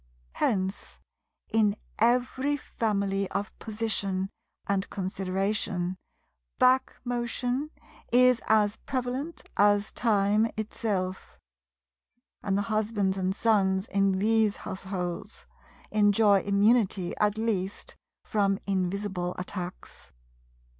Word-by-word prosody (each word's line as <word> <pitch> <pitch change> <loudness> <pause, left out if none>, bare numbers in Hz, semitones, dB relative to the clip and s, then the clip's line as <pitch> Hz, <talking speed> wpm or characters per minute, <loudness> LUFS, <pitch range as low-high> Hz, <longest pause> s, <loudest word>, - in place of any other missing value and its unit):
Hence, 190 - -1 0.5
in 210 -2 +3 0.2
every 250 +5 +2
family 200 -6 -1
of 200 +1 -3
position 200 -4 -2 0.3
and 195 -1 -1
consideration, 190 -1 -2 0.6
"back 255 +1 +4
motion" 245 +3 -2 0.4
is 250 0 +5
as 215 -1 +3
prevalent 265 +4 -4
as 205 0 +4
time 215 0 +2
itself; 200 -4 -3 1.0
and 195 -1 0
the 205 - +1
husbands 215 -3 0
and 190 0 -1
sons 195 -4 +2
in 195 -2 +1
these 215 +1 +2
households 185 -2 -5 0.5
enjoy 205 -1 +4
immunity 200 -2 +2
at 210 0 +2
least 205 -4 -2 0.3
from 200 -2 +1
invisible 190 -1 -1
attacks. 180 - -7
205 Hz, 90 wpm, -28 LUFS, 190-225 Hz, 1.0 s, is